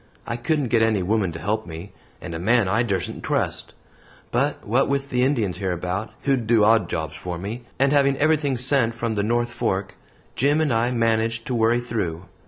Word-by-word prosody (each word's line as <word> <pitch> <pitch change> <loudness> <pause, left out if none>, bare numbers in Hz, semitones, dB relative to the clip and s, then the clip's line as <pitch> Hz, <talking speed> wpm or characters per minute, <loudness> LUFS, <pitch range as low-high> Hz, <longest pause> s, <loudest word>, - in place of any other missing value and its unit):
I 115 - -3
couldn't 135 +2 -1
get 115 0 +3
any 110 -4 +2
woman 100 -1 +1
to - - -6
help 110 +4 -2
me, 85 +4 -8 0.3
and 85 - -6
a 80 - -4
man 115 +3 +3
I 110 +5 +2
dursen't 100 -7 -2
trust; - - -2 0.6
but - - 0
what 125 +7 +2
with 140 0 -1
the 125 - +1
Indians 120 -9 +1
hereabout, 90 +2 -2
who'd 130 -5 +1
do 115 -2 +4
odd 110 -4 +4
jobs 80 -1 -3
for 85 +3 -5
me, 110 +7 -6
and 140 +1 +3
having 140 -1 +3
everything 145 -3 +2
sent 125 -2 +1
from 115 -1 -2
the 105 - 0
North 120 +3 0
Fork, 95 -3 -2 0.4
Jim 145 +4 +2
and 155 -6 +1
I 115 +2 +2
managed 115 -1 0
to 130 - -3
worry 115 +1 +3
through. 95 -8 -3
115 Hz, 195 wpm, -23 LUFS, 95-125 Hz, 0.6 s, do